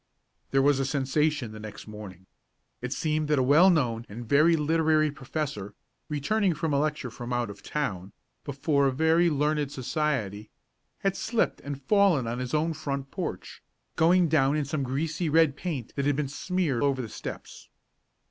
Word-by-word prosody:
There 135 0 +3
was 145 -1 +4
a - - +1
sensation 140 -1 0
the 110 - -9
next 110 -1 -9
morning. 105 -4 -10 0.6
It 125 0 -4
seemed 155 +1 -1
that 150 -1 +2
a 130 - +3
well 150 +8 +6
known 120 -9 +1
and 115 +3 -8
very 155 +6 +5
literary 155 0 +2
professor, 135 -7 -5 0.3
returning 175 +6 +1
from 150 0 -1
a 140 - +3
lecture 150 -4 -2
from 120 +2 -7
out 120 -3 -1
of 100 - -13
town, 100 -11 -3 0.3
before 140 0 +1
a - - +2
very 160 +5 +3
learned 150 -1 0
society, 125 - -2 0.5
had 195 -1 +1
slipped 230 +2 -1
and 140 -1 -6
fallen 190 - +3
on 115 +2 -3
his 125 +2 -2
own 160 +2 +1
front 140 -3 -4
porch, - - -5 0.3
going 175 +2 +4
down 145 -2 +3
in 150 - -1
some 140 +1 -2
greasy 155 +6 -2
red 160 -2 +4
paint 150 -11 -5
that 140 - -1
had 145 - +2
been 150 -1 -1
smeared 150 -2 -1
over 140 -2 +1
the 120 - -3
steps. - - -8
145 Hz, 175 wpm, -27 LUFS, 125-155 Hz, 0.6 s, well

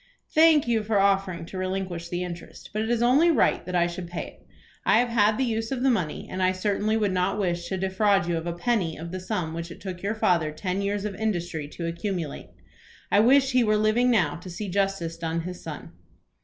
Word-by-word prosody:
"Thank 315 -3 +5
you 230 -2 +2
for 210 0 0
offering 195 -4 +1
to 185 +2 -7
relinquish 185 -2 -3
the 175 +1 -2
interest; 175 -1 -9
but 215 - -1
it 220 - -2
is 240 -1 +1
only 275 +8 +5
right 330 - +3
that 180 - -3
I 175 -1 +4
should 175 0 -5
pay 175 0 -5 0.2
it. - - -29 0.4
I - - +4
have 245 +1 +2
had 215 -2 +3
the 265 - +1
use 225 -1 -2
of 260 -2 -2
the 270 - +4
money, 180 -10 -2
and 185 - -4
I 185 0 +3
certainly 205 +3 0
would 210 -3 +1
not 185 +2 0
wish 175 -3 -1
to 190 - -2
defraud 190 0 +2
you 175 - 0
of 165 +1 -3
a 170 - -1
penny 175 -3 0
of 165 +2 -7
the 185 - -4
sum 180 -3 -3
which 170 +1 -5
it 170 - -10
took 185 -2 -7
your 205 +3 -1
father 170 -7 +2
ten 185 +5 -3
years 200 +1 -1
of 210 - -3
industry 175 -7 -2
to 170 - -5
accumulate. 170 -2 -4 0.6
I 205 - +5
wish 265 +4 +5
he 250 -1 +4
were 215 -1 +3
living 215 +4 +3
now 175 -11 +2
to 180 +2 -10
see 195 +3 -5
justice 195 -3 -1
done 165 0 -2
his 180 +1 -7
son." - - -7
190 Hz, 235 wpm, -26 LUFS, 175-220 Hz, 0.6 s, Thank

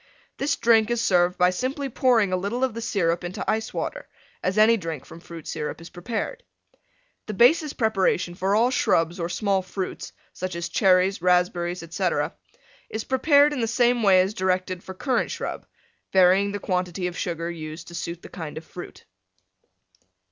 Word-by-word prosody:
This 280 +2 0
drink 225 -1 +3
is 240 -1 0
served 180 -4 +2
by 180 0 +4
simply 265 +8 -3
pouring 230 -6 +2
a - - +4
little 200 +8 -2
of 260 -3 +1
the 230 - -5
Syrup 175 -6 0
into 175 +1 -5
Ice 220 0 -1
Water, - - -5 0.3
as 185 +3 -1
any 220 +2 +6
drink 165 - -5
from 165 - -12
Fruit 170 -2 -11
Syrup 150 - -4
is 165 - -12
prepared. 230 - -4 0.9
The 215 - -4
basis 300 - +4
preparation 195 -6 +1
for 190 +3 0
all 235 +4 +3
Shrubs 170 -7 +1
or 170 0 -2
Small 195 +1 0
Fruits, 185 +1 -5 0.2
such 185 -1 -5
as 170 0 -4
Cherries, 185 -1 +3
Raspberries, 180 -1 +1
etc., 165 +1 -1 0.6
is 220 0 -4
prepared 285 +2 +4
in 280 - -3
the 230 - 0
same 240 +1 +2
way 190 -3 +6
as 190 +3 -1
directed 185 -2 -1
for 190 - -9
Currant 255 +5 0
Shrub, - - -5 0.4
varying 190 +2 +4
the 205 - -3
quantity 180 -2 -2
of 180 -1 -3
Sugar 170 -1 -3
used 160 0 -8
to - - -12
suit 170 0 -5
the - - -9
kind 160 -5 -7
of 160 - -8
Fruit. 175 - -10
185 Hz, 175 wpm, -24 LUFS, 175-230 Hz, 0.9 s, any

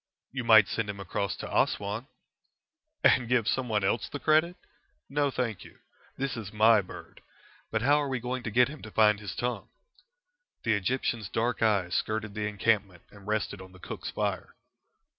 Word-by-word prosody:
"You 130 -2 -4
might 110 -4 +7
send 110 -2 -2
him 100 -1 -5
across 100 -1 -2
to - - -7
Assouan." 105 +5 0 1.0
"And 120 -2 +4
give 120 -3 +2
someone 115 -6 0
else 100 +3 0
the 145 - -5
credit? 160 +4 +3 0.5
No, 145 0 +1
thank 120 -7 -3
you. - - -15 0.4
This 135 -2 -2
is 110 -4 -6
my 110 0 +5
bird. 95 - -12 0.5
But 110 0 -1
how 145 +3 +4
are 145 - -2
we 130 -2 -2
going 125 +2 -3
to 115 - -4
get 125 +3 +4
him 150 +1 -9
to 110 - -9
find 105 -1 +4
his 105 -2 -6
tongue?" 125 0 -3 0.9
The 115 - +2
Egyptian's 110 0 -1
dark 120 +1 -1
eyes 100 -6 +2
skirted 110 -1 -1
the 105 0 -2
encampment 100 -3 0
and 100 -1 -15
rested 105 -2 -2
on 95 0 -13
the 95 - -15
cook's - - -6
fire. - - -3
110 Hz, 180 wpm, -28 LUFS, 100-125 Hz, 1.0 s, might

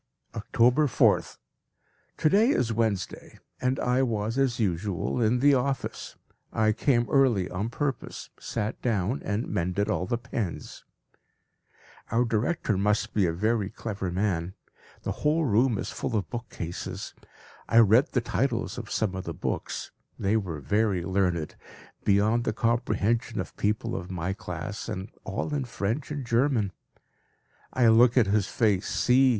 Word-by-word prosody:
October 120 +6 +3
4th. 110 -6 +2 0.8
To - - +2
day 210 +9 +4
is 120 - +1
Wednesday, 110 -5 -2 0.2
and 130 0 +1
I 125 +1 +2
was 115 -3 -1
as 130 -3 +1
usual 100 +3 -1
in 120 +2 +2
the 145 +1 +6
office. 135 0 -2 0.4
I 110 0 +2
came 120 +1 +2
early 125 -10 +3
on 100 +5 -2
purpose, 135 +2 -4
sat 110 -2 -3
down, 110 +1 0
and 105 +4 -2
mended 95 +1 -1
all 90 - -1
the 120 - 0
pens. 115 -6 -5 1.2
Our 120 +3 +2
director 115 - 0
must 105 +2 +1
be 100 -4 +3
a - - +1
very 105 +3 0
clever 100 -4 -4
man. 90 -2 -1 0.5
The - - -2
whole 155 +2 +2
room 120 0 +3
is - - -4
full 115 - -3
of 105 - -2
bookcases. 115 -8 -5 0.6
I 115 - +3
read 115 +5 +5
the 125 - +2
titles 125 +1 -1
of 115 - -8
some 110 -4 0
of 95 0 -5
the 85 - -5
books; - - -4 0.3
they 100 +3 +1
were 90 -9 -2
very 100 +4 +1
learned, 90 -4 0 0.5
beyond 105 +4 +3
the 115 - -1
comprehension 115 -1 0
of - - -5
people 105 +1 -1
of 90 0 -5
my 90 0 -2
class, 90 +3 -6
and 100 -2 -4 0.2
all 105 +9 -3
in 140 -3 -1
French 115 +4 -3
and 145 -3 -4
German. 115 -4 +2 1.0
I 125 -2 +3
look 120 +3 +5
at 120 - +6
his 100 0 +1
face; 105 -4 +1
see! 130 +1 +4
110 Hz, 150 wpm, -27 LUFS, 100-125 Hz, 1.2 s, the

